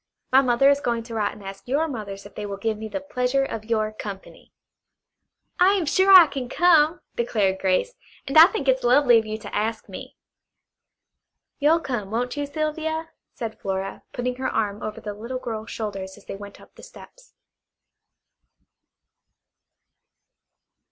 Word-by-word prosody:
My 265 +1 +7
mother 255 +1 +3
is 285 - +2
going 235 -3 -1
to 230 0 -10
write 210 -2 -1
and 205 - -13
ask 195 +3 -9
your 290 +6 +1
mothers 205 -7 -7
if 205 - -12
they 210 - -6
will 200 -1 -5
give 220 +2 -1
me 220 +1 -7
the 290 - -4
pleasure 270 -1 0
of 220 -4 -6
your 215 -1 0
company." 200 -2 -9 1.1
"I 370 +2 +6
am 380 -5 0
sure 380 +6 +3
I 370 -3 +11
can 265 -4 -5
come," 335 0 +4
declared 205 -5 0
Grace, 190 - +1 0.3
"and 275 - -5
I 320 +2 +10
think 360 -9 -4
it's 260 0 +3
lovely 245 -1 +5
of 220 - -6
you 215 0 -3
to 220 - -9
ask 220 +2 -2
me." - - -10 1.4
"You'll 315 +3 +3
come, 235 -9 -4
won't 245 +4 -2
you, 290 -1 -3
Sylvia?" 315 +2 -3 0.3
said 225 -3 -6
Flora, 195 0 -4
putting 250 0 -3
her 260 - -2
arm 205 -2 -2
over 215 - -5
the 210 - -6
little 235 +5 -6
girl's 225 -3 -6
shoulders 195 -3 -5
as - - -18
they - - -6
went 200 0 -11
up - - -18
the - - -15
steps. - - -16
240 Hz, 170 wpm, -24 LUFS, 210-290 Hz, 1.4 s, I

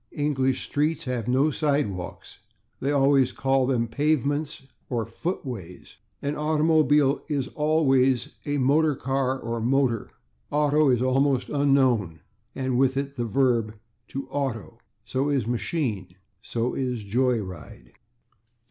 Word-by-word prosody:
English 135 -3 0
streets 155 +2 0
have 125 -5 -3
no 130 +5 +3
/sidewalks/; 140 - -2 0.4
they 135 - -1
always 135 -2 +3
call 135 -1 +1
them 120 -3 +1
/pavements/ 145 +2 -1 0.2
or 115 -3 -1
/footways/. 115 - -6 0.3
An 145 +1 -1
automobile 150 -2 +3
is 140 -4 -1
always 135 -5 +2
a 145 0 -1
/motor 145 +2 +2
car/ 135 0 -1
or 115 -1 -4
/motor/. 125 -2 +1 0.4
/Auto/ 150 -1 +3
is 125 0 +2
almost 135 0 +1
unknown, 130 - +2 0.3
and 130 -2 -1
with 135 0 +2
it 140 0 -3
the 120 -3 -2
verb 115 -2 +1 0.3
/to 135 0 -5
auto/. 135 -7 -3 0.3
So 135 +3 -1
is 140 -4 +1
/machine/. 115 - -2 0.3
So 115 +2 -2
is 125 -4 -2
/joy 120 +1 +1
ride 75 -8 -11
135 Hz, 125 wpm, -25 LUFS, 120-145 Hz, 0.4 s, no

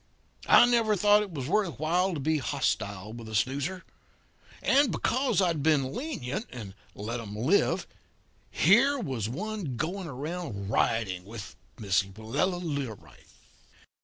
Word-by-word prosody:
I - - +8
never 230 -3 +3
thought 205 +2 +5
it 205 -3 -5
was 140 -6 -4
worth 195 -1 0
while 175 +4 +1
to - - -3
be 155 +2 +1
hostile 110 -7 -2
with 115 -1 -9
a 110 - -5
snoozer. 140 - -1 0.8
And 275 0 +4
because 255 -5 +1
I'd 170 -5 0
been 140 -3 +2
lenient, 230 - -4
and 105 -6 -8 0.2
let 115 +4 -4
'em 105 -3 -7
live, 135 - +2 0.6
here 270 +7 +4
was 130 - -3
one 190 - -4
going 180 +5 -3
around 140 - -5
riding 100 -6 0
with 105 +1 -9 0.2
Miss 105 -3 +2
Willella 110 - -2
Learight! 140 - -6
145 Hz, 135 wpm, -28 LUFS, -, 0.8 s, I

